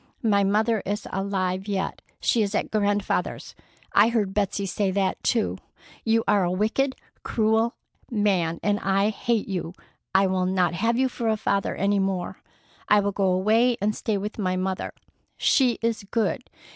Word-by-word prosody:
My 200 -3 +3
mother 215 +2 +2
is 205 +2 -3
alive 190 0 -2
yet. 195 -1 -2 0.2
She 235 - +2
is 205 0 -1
at - - -1
Grandfather's. 205 -1 -1 0.4
I 210 +3 +6
heard 210 -5 0
Betsey 200 -1 0
say 195 +1 0
that 190 0 0
too. 225 -3 0 0.4
You 225 0 +2
are 205 -2 +4
a 175 - +1
wicked, 220 +8 0 0.3
cruel 220 +1 +1 0.3
man, 190 -7 +1
and 205 0 +1
I 195 +2 +2
hate 220 +1 -1
you. 180 -3 -3 0.4
I 195 +1 +6
will 185 -1 0
not 185 -2 +1
have 230 +7 +1
you 260 +1 +3
for 240 -2 -4
a 220 - +1
father 200 -1 0
any 200 +1 +1
more. 190 -2 -2 0.5
I 210 - +6
will 200 0 0
go 195 -1 0
away 220 +6 +3
and 210 +2 0
stay 215 -2 -1
with 210 +3 -5
my 185 -2 0
mother. 185 0 -3 0.4
She 250 -4 +3
is 230 -1 0
good. 230 +3 -1
205 Hz, 170 wpm, -25 LUFS, 190-220 Hz, 0.5 s, I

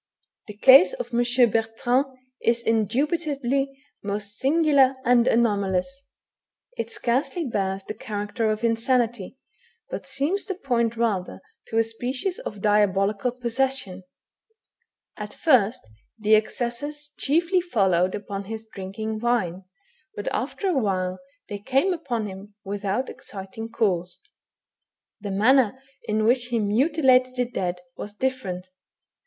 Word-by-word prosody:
The 210 -1 -9
case 270 - +8
of - - -6
M. 240 0 +3
Bertrand 230 +5 +1 0.3
is 235 0 +1
indubitably 275 - 0 0.3
most 205 0 -4
singular 280 -2 +4
and 240 0 +4
anomalous; 220 +3 +1 0.7
it - - -3
scarcely 275 +8 -1
bears 195 -5 -2
the 215 - -6
character 215 +1 -3
of 215 +1 -2
insanity, 235 -1 0 0.5
but - - -5
seems 335 +9 0
to 385 - -2
point 235 -8 0
rather 210 -6 -1 0.3
to 225 - -3
a 225 - +5
species 255 - -3
of 205 -2 -7
diabolical 205 +1 +2
possession. 250 -5 -1 1.2
At - - -7
first 250 - +3 0.3
the 215 0 +4
accesses 290 +7 -2
chiefly 340 +5 +2
followed 190 - +1
upon 200 -1 -5
his 220 +2 -7
drinking 215 +3 -5
wine, 195 -6 0 0.5
but 205 - -6
after 300 +9 -2
a 355 -6 +1
while 185 -4 -1 0.3
they 205 - -5
came 270 - +1
upon 245 -10 -3
him 200 +1 -9
without 205 +5 -2
exciting 200 +3 -8
cause. 180 -6 -1 1.0
The 205 -1 -6
manner 240 +4 +3 0.3
in 215 0 0
which 245 +2 +3
he 240 -1 -1
mutilated 255 +3 +3
the 250 -1 +1
dead 180 -7 -3
was 205 0 -8
difierent. 255 -9 -2
230 Hz, 125 wpm, -24 LUFS, 205-265 Hz, 1.2 s, case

